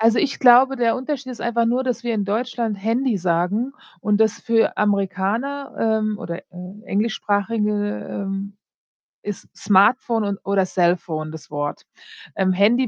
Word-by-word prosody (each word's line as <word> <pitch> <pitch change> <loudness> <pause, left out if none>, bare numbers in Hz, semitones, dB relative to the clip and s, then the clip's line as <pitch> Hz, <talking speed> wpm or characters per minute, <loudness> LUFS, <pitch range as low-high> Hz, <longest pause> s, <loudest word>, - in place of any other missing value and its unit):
Also, 225 +1 +4
ich 280 - 0
glaube, 260 +2 +6
der 235 -2 +2
Unterschied 260 -1 -4
ist - - -10
einfach 235 0 +1
nur, 245 +3 +1
dass 250 -2 -2
wir 235 - 0
in 205 -2 -1
Deutschland 230 0 -1
„Handy“ 235 +1 +1
sagen 185 +8 0 0.3
und 210 0 +1
das 220 0 +4
für 230 -1 +2
Amerikaner, 210 +7 -1 0.3
ähm, 215 -1 -2
oder, 170 +1 -5
äh, 185 +4 -11
Englischsprachige, 210 0 0 0.4
ähm, 195 0 -4 0.7
ist 205 -2 -7
„Smartphone“ 220 +3 +3
und 200 -1 -2
oder 195 -1 +2
„Cellphone“ 170 -4 0
das 160 -2 -11
Wort. 145 0 -3 0.5
Ähm, 190 -1 +2
„Handy“ 230 +7 +3
210 Hz, 150 wpm, -21 LUFS, 195-240 Hz, 0.7 s, glaube